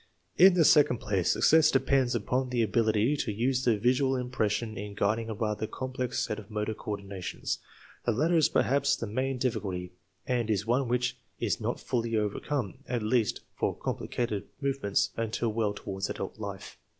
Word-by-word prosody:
In 185 +1 +7
the 165 -3 +5
second 145 -6 +5
place, 95 -5 0
success 160 -1 +5
depends 135 -2 +2
upon 125 +4 0
the 120 -2 +1
ability 110 +4 +2
to 115 - -1
use 125 +5 0
the 120 -4 +3
visual 130 +4 +2
impression 120 -3 -1
in 100 +1 -6
guiding 110 +2 0
a 110 - -3
rather 105 0 -2
complex 130 +1 -3
set 105 - -4
of 105 -1 -12
motor 105 0 -2
coordinations. 100 -4 -4 0.5
The - - +4
latter 155 +10 +2
is 160 -3 +4
perhaps 140 +1 +2
the 115 - -4
main 130 +5 -1
difficulty, 95 -8 -2 0.3
and 120 -3 0
is 105 -2 +1
one 125 +3 +1
which 125 +1 0 0.2
is 115 0 -1
not 115 +3 -2
fully 115 -2 -1
overcome, 105 - -2
at 120 -3 -1
least 110 0 +1
for - - -1
complicated 110 -5 -3
movements, 120 -8 0
until 115 +1 -1
well 110 -2 +1
toward 95 -1 -4
adult 95 - -5
life. 100 -2 -7
115 Hz, 170 wpm, -29 LUFS, 105-130 Hz, 0.5 s, In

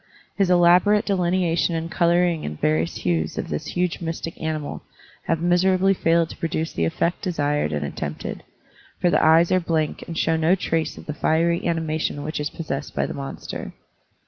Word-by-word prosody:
His 195 -3 +2
elaborate 180 +4 +5
delineation 175 -3 +1
and 165 +1 -3
coloring 175 -1 +2
in 75 - -4
various 80 +2 0
hues 80 -3 -1
of - - -3
this 75 - -4
huge 180 -1 -1
mystic 165 0 -4
animal 155 -2 -3 0.5
have 165 -1 0
miserably 185 +2 +3
failed 165 -2 +2
to - - -10
produce 160 0 -2
the 85 - 0
effect 170 - -1
desired 145 - 0
and 75 -1 -2
attempted, 75 +1 -5 0.6
for 175 -1 +2
the - - +3
eyes 165 +2 +5
are 185 - +4
blank 160 -3 -1
and 165 - -6
show 165 - +2
no 160 +3 +3
trace 165 -3 -2
of - - -11
the 150 - -4
fiery 170 +3 +1
animation 160 -3 -1
which 155 +1 -4
is 150 - -2
possessed 150 -3 -5
by - - +1
the - - -5
monster. 140 -1 -6
165 Hz, 175 wpm, -23 LUFS, 150-175 Hz, 0.6 s, elaborate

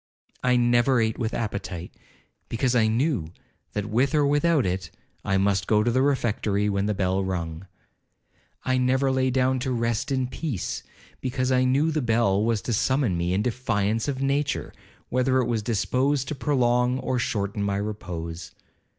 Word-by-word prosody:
'I 125 0 +3
never 120 +1 +3
ate 110 -1 0
with 115 -2 -1
appetite, 95 -6 -4 0.6
because 125 +2 0
I 110 -2 +4
knew, 115 - 0 0.4
that 105 -1 -2
with 125 +8 +1
or 150 -1 +4
without 145 0 +2
it, 95 0 -2 0.3
I 95 -2 +1
must 95 -2 +1
go 105 -1 +3
to 120 - +1
the 130 +2 +2
refectory 110 -7 +1
when 100 0 0
the 105 - 0
bell 95 0 0
rung. 85 -1 -4 1.0
I 130 0 +2
never 130 +2 +2
lay 130 0 +1
down 130 0 +1
to 130 +1 -2
rest 115 +2 -1
in 130 -1 +1
peace, 130 - -4 0.4
because 130 0 -1
I 130 0 +3
knew 140 +5 +2
the 155 -1 0
bell 110 -4 +2
was 110 -3 0
to 120 - -2
summon 130 -2 +1
me 85 +1 -1
in 100 - +1
defiance 110 -2 0
of 135 -1 -2
nature, 140 +1 -1 0.4
whether 130 +1 +2
it 130 - +2
was 115 -2 0
disposed 130 +6 0
to - - -2
prolong 125 -3 +1
or 130 -1 -1
shorten 105 -4 -2
my 100 -1 0
repose. 90 -5 -5
120 Hz, 170 wpm, -25 LUFS, 100-130 Hz, 1.0 s, I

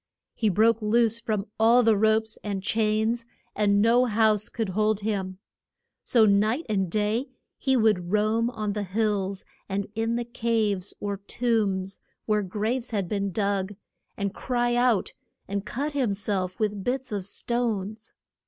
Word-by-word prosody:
He 220 - +1
broke 225 +4 +3
loose 230 +1 +2
from 215 -3 -2
all 235 +3 +6
the 225 -1 +4
ropes 220 +1 +1
and 200 -2 -3
chains, 220 +2 +1 0.3
and 205 -1 +3
no 240 +2 +4
house 215 -2 +2
could 225 -4 -3
hold 215 +2 +1
him. 195 -3 -2 0.6
So 230 -3 +4
night 215 +8 +2
and 195 -4 0
day 215 +7 0 0.3
he 265 -1 +2
would 210 -6 +2
roam 215 +2 +2
on 215 -4 -3
the 210 - -2
hills 200 -1 -1 0.2
and 200 0 -1
in 225 +1 -1
the 240 0 -2
caves 220 -5 -1
or 200 -1 -3
tombs, 200 -3 -1 0.3
where 210 -1 +2
graves 220 +6 -2
had 200 -5 -1
been 200 0 -1
dug, 200 0 -1 0.4
and 200 -1 -2
cry 240 0 0
out 240 -4 +2 0.3
and 200 +1 -3
cut 285 +5 -2
him 260 -8 0
self 195 -1 -3
with 210 -2 -1
bits 260 +2 -2
of 200 -3 -3
stones. 220 -2 -2
215 Hz, 155 wpm, -26 LUFS, 200-230 Hz, 0.6 s, all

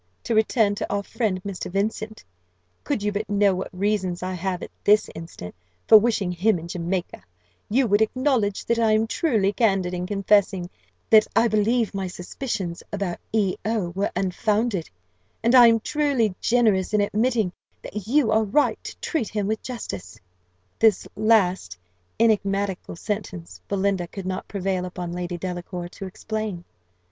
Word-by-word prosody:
To - - -1
return 220 -1 +3
to 205 - -4
our 200 0 -1
friend 195 -5 -2
Mr. 190 -2 -5
Vincent: 215 +2 -2 0.6
could 205 - -2
you 210 - +1
but 205 +1 -3
know 200 -1 +3
what 185 +1 -4
reasons 190 -2 -1
I 185 0 -2
have, 185 0 -3
at - - -8
this 210 +1 +4
instant, 160 - -9 0.3
for 220 - +10
wishing 210 -5 0
him 185 +3 +2
in 165 0 -8
Jamaica, 175 +1 -3 0.5
you 260 +5 +3
would 205 -1 +3
acknowledge 230 -3 +1
that 235 0 +1
I 225 -2 +3
am 215 +1 +3
truly 220 - +1
candid 195 -6 +1
in 180 0 -3
confessing 195 -2 +2 0.4
that 215 -1 +7
I 230 - +5
believe 220 +1 +1
my 195 -1 -2
suspicions 180 -1 -5
about 200 -4 -3
E 205 -4 +1
O 215 -5 -1
were 195 +4 -1
unfounded; 205 0 0 0.5
and 235 +2 +3
I 245 -2 +9
am 230 0 +4
truly 270 -5 +1
generous 215 -5 +2
in 210 - +4
admitting 215 -2 +1 0.3
that 210 -1 -6
you 260 -2 +3
are 220 0 +3
right 220 +8 +1
to - - -8
treat 290 -10 -1
him 210 -2 -2
with 215 +2 -1
justice." 100 - -7 0.6
This 220 -4 +3
last 190 - +2 0.4
enigmatical 200 -5 +1
sentence 90 - -5
Belinda 195 -2 0
could 190 +2 -8
not 185 0 -4
prevail 190 -2 -2
upon 180 -1 -5
Lady 175 0 -4
Delacour 175 0 -5
to 195 +1 -8
explain. 215 -2 -4
200 Hz, 160 wpm, -24 LUFS, 185-220 Hz, 0.6 s, for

